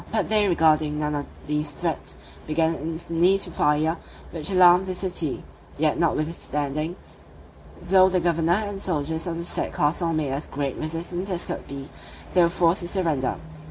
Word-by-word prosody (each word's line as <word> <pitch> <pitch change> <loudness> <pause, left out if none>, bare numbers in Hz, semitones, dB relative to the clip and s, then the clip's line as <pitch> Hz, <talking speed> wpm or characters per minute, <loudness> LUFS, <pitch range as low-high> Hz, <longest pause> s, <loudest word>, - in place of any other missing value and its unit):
But 220 - 0
they 210 -1 +4
regarding 155 -3 +3
none 150 0 -1
of 145 -1 -3 0.2
these 150 0 -1
threats, 165 +2 -4 0.3
began 160 +1 +1
instantly 165 +4 +1
to 195 -3 0
fire, 155 +2 +1 0.3
which 165 +1 -2
alarmed 185 0 +6
the 185 - -2
city; 175 -6 -1 0.3
yet 155 +1 +1
notwithstanding, 155 -1 -1 0.8
though 190 -1 +5
the 185 -1 +1
governor 170 +3 +1
and 200 -1 -5
soldiers 160 -1 -2
of 165 -1 -3
the 170 - -4
said 175 - -2
castle 165 +3 +1
made 155 -4 -1
as 140 +3 -3
great 140 -2 -3
resistance 170 +4 -3
as 180 -2 -1
could - - -5
be, 140 0 -7 0.5
they 180 - +5
were 170 - +5
forced 170 +1 +2
to 175 - -3
surrender. 160 -9 0
165 Hz, 165 wpm, -24 LUFS, 150-180 Hz, 0.8 s, alarmed